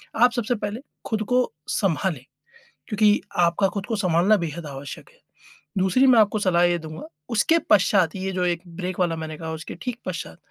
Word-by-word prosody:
आप 245 Hz, +2 st, +5 dB
सबसे 240 Hz, 0 st, -1 dB
पहले 210 Hz, +1 st, -4 dB, 0.3 s
ख़ुद 220 Hz, -2 st, -1 dB
को 250 Hz, 0 st, +2 dB, 0.3 s
संभालें। 175 Hz, -, 0 dB, 0.6 s
क्योंकि 210 Hz, -1 st, +3 dB, 0.2 s
आपका 175 Hz, +2 st, +3 dB
ख़ुद 200 Hz, -1 st, -3 dB
को 225 Hz, -, -2 dB
संभालना, 185 Hz, +1 st, +3 dB
बेहद 165 Hz, +1 st, -5 dB
आवश्यक 140 Hz, -1 st, -8 dB
हैं। -, -, -27 dB, 0.6 s
दूसरी 190 Hz, +8 st, +3 dB
मैं 245 Hz, -3 st, +6 dB
आपको 215 Hz, 0 st, +3 dB
सलाह 175 Hz, -2 st, +3 dB
ये 175 Hz, 0 st, +2 dB
दूँगा, 155 Hz, 0 st, -8 dB, 0.2 s
उसके 230 Hz, +9 st, +3 dB
पश्चात 190 Hz, -4 st, +4 dB
ये 190 Hz, 0 st, -3 dB
जो 180 Hz, -1 st, 0 dB
एक 175 Hz, -1 st, 0 dB
ब्रेक 185 Hz, 0 st, -4 dB
वाला 175 Hz, -2 st, +1 dB
मैंने 160 Hz, -1 st, -6 dB
कहा 160 Hz, 0 st, -6 dB
उसके 160 Hz, 0 st, -7 dB
ठीक 245 Hz, +4 st, -4 dB
पश्चात, 180 Hz, -1 st, -5 dB
185 Hz, 185 wpm, -24 LUFS, 170-215 Hz, 0.6 s, मैं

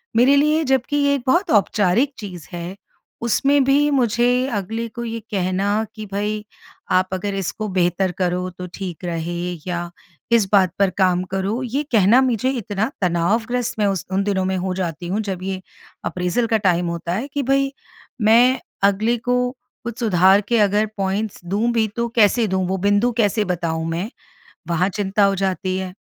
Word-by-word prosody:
मेरे 255 Hz, +4 st, +5 dB
लिए 305 Hz, +2 st, +3 dB
जबकि 265 Hz, +1 st, +1 dB
ये 285 Hz, -1 st, +3 dB
एक 265 Hz, -, -4 dB
बहुत 345 Hz, +9 st, +2 dB
औपचारिक 210 Hz, +5 st, +2 dB
चीज़ 180 Hz, -7 st, -8 dB
है, 175 Hz, +2 st, -5 dB, 0.5 s
उसमें 275 Hz, +4 st, +2 dB
भी 285 Hz, +2 st, +3 dB
मुझे 245 Hz, 0 st, +2 dB
अगले 225 Hz, +4 st, -3 dB
को 235 Hz, +2 st, -7 dB
ये 230 Hz, 0 st, -4 dB
कहना 195 Hz, +3 st, 0 dB
कि 215 Hz, -1 st, -7 dB
भई 210 Hz, +1 st, -2 dB, 0.5 s
आप 185 Hz, 0 st, +3 dB
अगर 200 Hz, +2 st, -2 dB
इसको 195 Hz, +3 st, -3 dB
बेहतर 185 Hz, 0 st, +1 dB
करो 180 Hz, 0 st, 0 dB
तो 180 Hz, -, -6 dB
ठीक 180 Hz, -3 st, -6 dB
रहे 170 Hz, 0 st, -3 dB, 0.3 s
या 175 Hz, -1 st, -3 dB, 0.4 s
इस 225 Hz, -4 st, +4 dB
बात 190 Hz, -4 st, +4 dB
पर 200 Hz, -1 st, +4 dB
काम 185 Hz, -2 st, +2 dB
करो, 195 Hz, +6 st, -1 dB
ये 260 Hz, +4 st, -2 dB
कहना 220 Hz, +5 st, +5 dB
मुझे 255 Hz, 0 st, +1 dB
इतना 220 Hz, -2 st, -2 dB
तनावग्रस्त 225 Hz, +8 st, 0 dB
मैं 205 Hz, -, +3 dB
उस 195 Hz, -3 st, -1 dB
उन 195 Hz, +1 st, +1 dB
दिनों 195 Hz, -2 st, 0 dB
में 190 Hz, 0 st, 0 dB
हो 185 Hz, 0 st, -2 dB
जाती 175 Hz, -2 st, -4 dB
हूँ 210 Hz, +3 st, 0 dB
जब 190 Hz, -3 st, -4 dB
ये 190 Hz, -1 st, -3 dB, 0.4 s
अप्रेजल 180 Hz, +6 st, -1 dB
का 225 Hz, -, +2 dB
टाइम 180 Hz, -4 st, +1 dB
होता 170 Hz, 0 st, -3 dB
है, 230 Hz, +9 st, -2 dB
कि 285 Hz, 0 st, -3 dB
भई 275 Hz, +1 st, +1 dB, 0.5 s
मैं 240 Hz, +4 st, +5 dB, 0.2 s
अगले 210 Hz, +4 st, +3 dB
को 250 Hz, +1 st, 0 dB, 0.3 s
कुछ 235 Hz, 0 st, -6 dB
सुधार 190 Hz, -2 st, +4 dB
के 235 Hz, -, +3 dB
अगर 205 Hz, +1 st, +3 dB
पॉइंट्स 195 Hz, +2 st, -2 dB
दूँ 210 Hz, +6 st, 0 dB
भी 225 Hz, -2 st, +2 dB
तो 235 Hz, 0 st, 0 dB
कैसे 225 Hz, +1 st, +4 dB
दूँ 190 Hz, -1 st, 0 dB
वो 190 Hz, +1 st, -1 dB
बिंदु 205 Hz, +5 st, +2 dB
कैसे 210 Hz, -1 st, +2 dB
बताऊँ 165 Hz, -3 st, -2 dB
मैं, 175 Hz, +7 st, -3 dB, 0.6 s
वहाँ 170 Hz, +2 st, +1 dB
चिंता 200 Hz, 0 st, 0 dB
हो 195 Hz, 0 st, +3 dB
जाती 185 Hz, 0 st, -1 dB
है। 190 Hz, -1 st, -5 dB
205 Hz, 175 wpm, -21 LUFS, 185-235 Hz, 0.6 s, मेरे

